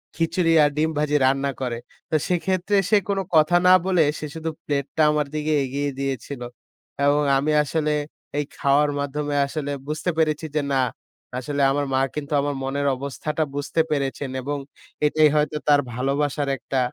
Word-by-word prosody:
খিচুড়ি 165 0 +1
আর 145 - +4
ডিম 155 +1 +2
ভাজি 150 0 +1
রান্না 135 +1 +2
করে। 125 -3 -2 0.3
তো - - 0
সেক্ষেত্রে 185 +3 0
সে 215 - +6
কোনো 195 -1 +1
কথা 155 +2 +5
না 185 - +8
বলে 180 -3 +3 0.2
সে - - -5
শুধু 160 0 -3 0.2
প্লেটটা 145 +1 -1
আমার 150 -1 0
দিকে 155 0 0
এগিয়ে 140 +2 -2
দিয়েছিল 135 -1 -4 0.6
এবং 145 +1 +4 0.2
আমি 145 +3 0
আসলে 150 +1 -1 0.5
এই 150 - 0
খাওয়ার 145 +1 +3
মাধ্যমে 145 +1 -2
আসলে 145 0 -4 0.2
বুঝতে 155 +4 -2
পেরেছি 155 -1 +1
যে 150 - +2
না, - - +3 0.6
আসলে 140 +3 -3
আমার 145 +1 0
মা 130 - +3 0.2
কিন্তু 150 0 -4
আমার 145 0 -2
মনের 140 +1 -1
অবস্থাটা 140 +4 -3
বুঝতে 145 +3 0
পেরেছেন 140 -1 -1
এবং 145 +3 -3 0.5
এটাই 155 +1 +4
হয়তো 150 0 +1
তার 145 -1 +5
ভালোবাসার 140 +3 -1
একটা 135 0 -2
145 Hz, 165 wpm, -23 LUFS, 140-155 Hz, 0.6 s, না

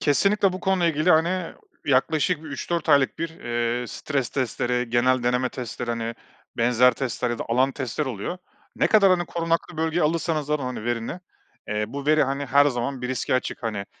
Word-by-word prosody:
Kesinlikle 200 +6 +3
bu 185 - -5
konuyla 190 -3 +2
ilgili 155 +5 +2
hani 170 +2 +2 0.3
yaklaşık 150 +4 +2
3-4 160 +3 -3
aylık 140 -3 +4
bir, 165 - -2
eee, 120 -4 -2
stres 135 -3 -2
testleri, 125 -2 -1
genel 125 +1 +3
deneme 125 +1 +1
testleri 120 -1 -5
hani 115 0 -3 0.4
benzer 125 +2 +4
testler 125 -2 -2
ya 120 - -3
da - - -3
alan 130 +3 +2
testler 130 +2 -3
oluyor. 125 - -4 0.4
Ne - - +3
kadar 200 -3 +5
hani 175 -1 +2
korunaklı 165 0 -2
bölgeye 160 +2 0
alırsanız 155 -1 0
alın 125 -7 -2
verini, 120 +8 -3 0.5
eee, 105 0 0
bu 140 +1 -6
veri 155 0 +5
hani 140 +1 -2
her 140 +2 +5
zaman 125 0 -2
bir 125 - -2
riske 130 0 -1
açık. 125 - -2
Hani, 105 -3 -3
135 Hz, 175 wpm, -24 LUFS, 120-160 Hz, 0.5 s, kadar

